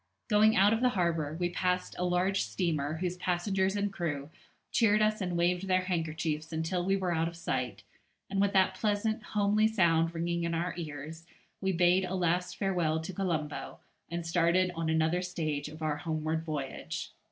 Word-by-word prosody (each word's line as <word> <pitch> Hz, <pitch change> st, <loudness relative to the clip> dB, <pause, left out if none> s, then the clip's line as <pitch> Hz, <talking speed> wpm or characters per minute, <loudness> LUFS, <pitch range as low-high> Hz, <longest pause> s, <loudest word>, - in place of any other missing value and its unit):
Going 215 Hz, +1 st, +5 dB
out 200 Hz, +3 st, +5 dB
of 225 Hz, -, 0 dB
harbour 170 Hz, -, +1 dB
we 175 Hz, -1 st, 0 dB
passed 180 Hz, 0 st, 0 dB
a -, -, 0 dB
large 180 Hz, +2 st, +1 dB
steamer 155 Hz, -5 st, -1 dB
whose 180 Hz, +2 st, -2 dB
passengers 190 Hz, +2 st, 0 dB
and 205 Hz, -1 st, -1 dB
crew 155 Hz, -5 st, -3 dB, 0.4 s
cheered 215 Hz, -2 st, +4 dB
us 215 Hz, 0 st, +2 dB
and 180 Hz, -2 st, -1 dB
waved 180 Hz, +2 st, +1 dB
their 185 Hz, 0 st, +3 dB
handkerchiefs 160 Hz, -3 st, -2 dB
until 160 Hz, +3 st, -1 dB
we 195 Hz, +2 st, +2 dB
were 185 Hz, -3 st, 0 dB
out 165 Hz, 0 st, +1 dB
of 170 Hz, -, -6 dB
sight, 125 Hz, -9 st, -3 dB, 0.4 s
and 195 Hz, 0 st, 0 dB
with 200 Hz, 0 st, +3 dB
that 190 Hz, -1 st, +4 dB
pleasant 215 Hz, +2 st, 0 dB
homely 210 Hz, +1 st, +2 dB
sound 170 Hz, -6 st, +2 dB
ringing 170 Hz, +1 st, -1 dB
in 170 Hz, 0 st, -1 dB
our 170 Hz, +1 st, -1 dB
ears 160 Hz, 0 st, -7 dB, 0.3 s
we 190 Hz, -1 st, +1 dB
bade 180 Hz, +1 st, +4 dB
a 185 Hz, -, -3 dB
last 180 Hz, 0 st, 0 dB
farewell 175 Hz, -5 st, +1 dB
to 160 Hz, +4 st, -6 dB
Colombo, 165 Hz, -5 st, -3 dB, 0.3 s
and 170 Hz, 0 st, -4 dB
started 175 Hz, +2 st, +2 dB
on 165 Hz, -1 st, -2 dB
another 160 Hz, +2 st, +2 dB
stage 155 Hz, -5 st, -2 dB
of 155 Hz, +1 st, -9 dB
our 150 Hz, -1 st, 0 dB
homeward 160 Hz, 0 st, -2 dB
voyage. 150 Hz, -4 st, -4 dB
175 Hz, 175 wpm, -30 LUFS, 160-190 Hz, 0.4 s, Going